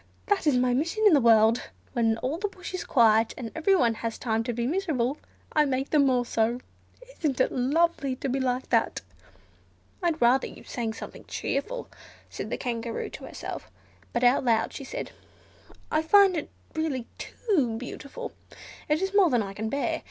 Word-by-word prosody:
That 405 -6 +1
is 275 -4 +4
my 250 0 +2
mission 330 - 0
in 410 - +7
the 285 - +5
world: 225 0 +4 0.2
when 225 -2 +2
all 290 +6 -1
the 415 - 0
bush 370 -2 -9
is 370 - -3
quiet, 225 -2 +4
and 230 -4 -6
everyone 325 -8 +3
has 225 0 -4
time 225 -2 -1
to 240 - -1
be 235 0 -2
miserable, 295 -5 0 0.3
I 300 -1 +4
make 270 0 -1
them 290 -3 +4
more 250 -2 +2
so—isn't 255 - -3
it - - +3
lovely 280 +1 +1
to 275 - -4
be 265 +1 0
like 255 0 -1
that?" - - +1 1.0
"I'd 335 -3 0
rather 245 +3 +4
you - - -12
sang 230 -2 -3
something - - -9
cheerful," 475 - -3 0.4
said - - -5
the - - -2
Kangaroo 235 -2 -3
to - - -9
herself, - - -7 0.4
but 235 - -1
out 245 +2 +5
loud 225 -2 +2
she - - -6
said, - - -6 0.8
"I 310 - +3
find 390 +3 +5
it 305 - -3 0.2
really 310 -6 -2
too 290 - -1
beautiful, 255 +3 -7 0.6
it 305 +5 +2
is 385 +1 -2
more 400 -4 +5
than 240 -5 +2
I 195 -1 -6
can 220 +2 -3
bear. 280 +3 -1
260 Hz, 180 wpm, -27 LUFS, 235-320 Hz, 1.0 s, in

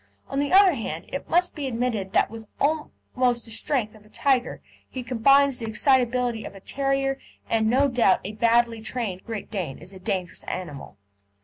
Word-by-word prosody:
On 275 - -2
the 285 0 0
other 380 0 +7
hand, 195 - -5
it 275 - -6
must 355 +1 +2
be 290 -2 -4
admitted 230 -6 -2
that - - +3
with 225 -1 -9
almost 255 -5 -1
the 225 - -8
strength 225 -1 0
of 215 -1 -17
a 210 - -21
tiger 260 +1 0 0.3
he 255 - -6
combines 270 +3 +4
the 225 - -4
excitability 245 0 +2
of - - -9
a - - -10
terrier, 275 +4 -1 0.3
and 220 -1 +1
no 270 +4 +4
doubt 240 -7 +3
a 200 - -5
badly 230 +1 +2
trained 215 -5 -4
Great 225 -3 -6
Dane 180 - -3
is 185 - -11
a 190 - -11
very - - -23
dangerous 190 -5 -3
animal. 150 - -6
235 Hz, 190 wpm, -25 LUFS, 215-270 Hz, 0.3 s, other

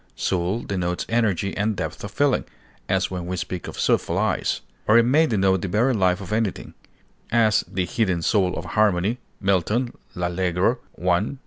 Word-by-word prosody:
Soul 95 +5 -1
denotes 90 -2 -2
energy 105 -4 +1
and 105 +1 0
depth 80 -4 -5
of 100 - -4
feeling, 140 +4 +1 0.4
as 95 0 +1
when 90 -2 -4
we 90 +1 -3
speak 90 -1 -4
of - - -7
soulful - - +1
eyes; - - 0 0.3
or 110 - +6
it 115 - +6
may 150 +7 +4
denote 95 -6 +2
the 100 - -2
very 115 +8 +2
life 95 -3 +2
of 95 +2 -5
anything; 110 -3 -2 0.6
as, 110 -2 +3
"the 90 -2 0
hidden 90 -3 0
soul 95 -3 +2
of - - -5
harmony," 105 +2 +2 0.2
MILTON 105 +6 +1 0.2
L'Allegro 90 +6 0 0.2
l. 90 +9 +1
95 Hz, 165 wpm, -23 LUFS, 90-110 Hz, 0.6 s, or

